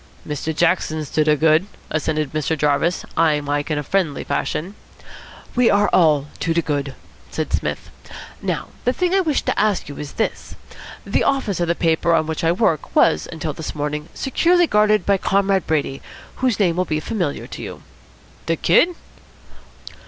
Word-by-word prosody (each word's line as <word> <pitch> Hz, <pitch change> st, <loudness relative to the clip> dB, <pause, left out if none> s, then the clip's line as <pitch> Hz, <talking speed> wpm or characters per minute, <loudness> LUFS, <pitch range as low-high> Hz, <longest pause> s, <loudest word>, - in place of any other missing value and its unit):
"Mr. 150 Hz, +1 st, -3 dB
Jackson's 155 Hz, -2 st, 0 dB
to 155 Hz, -, +2 dB
de 150 Hz, 0 st, +3 dB
good," 160 Hz, +4 st, +3 dB, 0.2 s
assented 155 Hz, -2 st, -1 dB
Mr. 155 Hz, +1 st, -1 dB
Jarvis, 150 Hz, +4 st, +1 dB
eyeing 155 Hz, -3 st, +2 dB
Mike 145 Hz, +1 st, -2 dB
in 150 Hz, -1 st, -1 dB
friendly 170 Hz, -2 st, 0 dB
fashion. 180 Hz, +6 st, -2 dB, 0.8 s
"We 245 Hz, -1 st, +4 dB
are 205 Hz, 0 st, +3 dB
all 155 Hz, -5 st, +4 dB
to 165 Hz, 0 st, -1 dB
de 170 Hz, -, +2 dB
good," 140 Hz, -3 st, -2 dB, 0.3 s
said -, -, -4 dB
Psmith. -, -, -2 dB, 0.5 s
"Now -, -, -3 dB
the 250 Hz, -, +2 dB
thing 360 Hz, +3 st, 0 dB
I 390 Hz, -, +4 dB
wished 315 Hz, -6 st, 0 dB
to -, -, 0 dB
ask 210 Hz, -2 st, +1 dB
you 145 Hz, -, -8 dB
is 145 Hz, -1 st, -7 dB
this. 220 Hz, -, -3 dB, 0.5 s
The -, -, +1 dB
office 265 Hz, -9 st, 0 dB
of 175 Hz, -, 0 dB
the 170 Hz, -, +1 dB
paper 165 Hz, 0 st, +2 dB
on 160 Hz, -1 st, +2 dB
which 160 Hz, +1 st, -4 dB
I 165 Hz, -, +4 dB
work 170 Hz, -4 st, 0 dB
was 75 Hz, -, +3 dB
until 160 Hz, -2 st, -4 dB
this 160 Hz, +1 st, -6 dB
morning 150 Hz, +1 st, -3 dB
securely 345 Hz, +6 st, +3 dB
guarded 210 Hz, -, +3 dB
by 200 Hz, -1 st, +3 dB
Comrade 195 Hz, -1 st, +1 dB
Brady, 145 Hz, -3 st, -1 dB, 0.4 s
whose 255 Hz, -5 st, 0 dB
name 175 Hz, -4 st, +2 dB
will 185 Hz, -, +1 dB
be 155 Hz, -2 st, -1 dB
familiar 175 Hz, -4 st, -3 dB
to -, -, -8 dB
you." -, -, -8 dB, 0.6 s
"De -, -, +2 dB
Kid?" 350 Hz, +1 st, +3 dB
165 Hz, 175 wpm, -21 LUFS, 150-200 Hz, 0.8 s, We